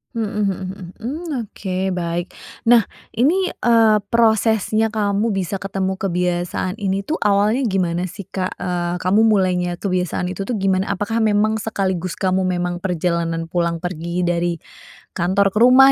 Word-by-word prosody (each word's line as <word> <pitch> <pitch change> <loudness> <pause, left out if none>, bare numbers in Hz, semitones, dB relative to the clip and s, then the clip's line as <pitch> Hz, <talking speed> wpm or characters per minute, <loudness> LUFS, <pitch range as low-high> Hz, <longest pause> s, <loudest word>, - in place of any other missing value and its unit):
Mhm 225 -2 -1 0.2
mhm 195 -2 0
mhm. 190 0 -8 0.2
Mmm, 305 +9 -5
oke 190 -3 -3
baik. 175 0 -3 0.3
Nah, 235 -2 +7 0.3
ini, 345 +10 +3
eee, 225 -6 +3
prosesnya 220 -1 +2
kamu 210 +1 0
bisa 195 0 -2
ketemu 190 0 -2
kebiasaan 180 0 -1
ini 195 -3 -1
tuh 305 +11 -2
awalnya 210 +5 +3
gimana 180 -5 0
sih, 200 -1 -9
Kak? 185 -1 -3
Eee, 175 -1 -2
kamu 200 +6 +3
mulainya 180 -4 +2
kebiasaan 180 -2 -1
itu 185 +2 -4
tuh 225 -1 -3
gimana? 190 0 +1
Apakah 215 +3 -1
memang 215 +1 +2
sekaligus 190 -5 -2
kamu 185 0 +1
memang 180 0 -2
perjalanan 170 -2 -1
pulang 170 -1 -1
pergi 175 0 -4
dari 170 -1 0 0.5
kantor 195 +3 +1
ke 210 - -1
rumah 255 +3 +8
190 Hz, 145 wpm, -20 LUFS, 180-215 Hz, 0.5 s, rumah